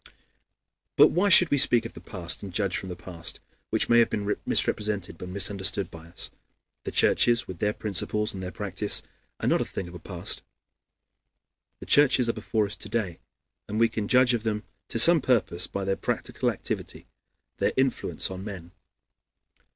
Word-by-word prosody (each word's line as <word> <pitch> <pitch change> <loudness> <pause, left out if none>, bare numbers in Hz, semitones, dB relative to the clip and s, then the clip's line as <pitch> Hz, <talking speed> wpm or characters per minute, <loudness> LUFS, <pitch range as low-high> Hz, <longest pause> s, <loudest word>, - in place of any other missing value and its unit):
But - - +7
why 195 +4 +1
should 180 -2 +7
we 145 - +3
speak 120 -2 +5
of 115 - -7
the - - -12
past 90 -4 -3
and 100 - -8
judge 95 0 -1
from 95 - -2
the 90 - -6
past, 85 -2 -7 0.3
which - - +2
may 120 0 +5
have 115 - +4
been 105 -1 -2
misrepresented 100 -6 0
and 90 - -7
misunderstood 95 -1 +1
by 80 0 -12
us? 85 - -4 0.5
The - - -4
churches, 120 -1 +3
with 90 -2 -8
their 105 - +1
principles 105 +1 0
and 95 - -7
their 90 - -5
practice, 100 +1 +1 0.4
are - - -2
not - - +2
a - - +1
thing 95 - -6
of 85 - -11
the 90 - -9
past. - - -4 1.4
The - - -8
churches 135 -4 +5
are 115 - 0
before 110 0 -1
us 100 - -6
to - - -8
day, 100 -8 -3 0.5
and 105 +2 -2
we 115 0 +4
can 110 -2 -4
judge 125 +1 +4
of 120 - -1
them 105 -1 -3 0.2
to - - -4
some 165 +7 +6
purpose 110 -9 0
by 100 -1 -5
their 95 0 -1
practical - - -2
activity, - - -6 0.5
their - - +1
influence 130 -6 -1
on 95 0 -7
men. 90 -5 -9
105 Hz, 185 wpm, -26 LUFS, 95-115 Hz, 1.4 s, But